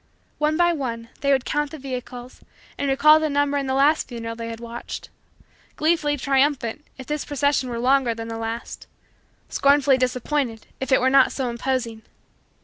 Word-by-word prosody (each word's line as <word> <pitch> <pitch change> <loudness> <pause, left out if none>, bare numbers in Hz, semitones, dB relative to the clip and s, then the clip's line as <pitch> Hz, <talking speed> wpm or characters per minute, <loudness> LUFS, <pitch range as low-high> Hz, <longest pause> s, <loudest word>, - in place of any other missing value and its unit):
One 305 +1 +1
by 345 0 +4
one, 230 -6 -4
they 280 0 +1
would 265 -2 +2
count 295 -1 -1
the 315 - -8
vehicles 250 -2 -7 0.3
and 280 - -2
recall 305 +3 +6
the 310 0 0
number 285 0 +1
in 275 - -3
the 265 - 0
last 290 +3 +3
funeral 230 -2 -6
they 230 0 -6
had 230 0 -7
watched; 235 0 -7 0.7
gleefully 305 -2 +1
triumphant, 275 -1 0
if 260 - -9
this 300 +1 -3
procession 285 -2 0
were 235 - -4
longer 250 -1 +2
than 225 0 -6
the 225 0 -5
last; 225 +1 -6 0.6
scornfully 280 -1 +3
disappointed, 250 -1 -1
if 265 - -4
it 260 - +5
were 260 +1 +3
not 270 -1 +5
so 260 -3 -2
imposing. 235 -2 -2
265 Hz, 175 wpm, -23 LUFS, 240-290 Hz, 0.7 s, recall